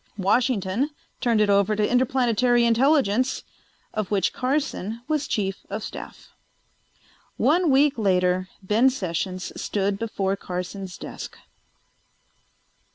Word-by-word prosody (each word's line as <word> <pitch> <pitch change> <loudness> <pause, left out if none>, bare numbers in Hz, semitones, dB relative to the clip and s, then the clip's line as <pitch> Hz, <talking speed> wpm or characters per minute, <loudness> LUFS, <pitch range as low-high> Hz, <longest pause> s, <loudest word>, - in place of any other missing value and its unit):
Washington 215 +3 +1 0.3
turned 230 -4 +2
it 210 - +3
over 200 +1 +3
to 210 0 +1
Interplanetary 245 -1 +2
Intelligence, 255 0 +2 0.5
of 215 -3 -2
which 200 -2 +1
Carson 250 -5 -2
was 305 -2 0
chief 195 -2 -2
of 210 +2 -4
staff. - - -9 1.1
One 350 -2 +3
week 275 -1 +4
later 185 -2 +2 0.2
Ben 220 +7 +4
Sessions 185 -5 -3
stood 200 -1 -1
before 195 -4 -1
Carson's 180 0 -6
desk. - - -8
215 Hz, 105 wpm, -24 LUFS, 195-255 Hz, 1.1 s, week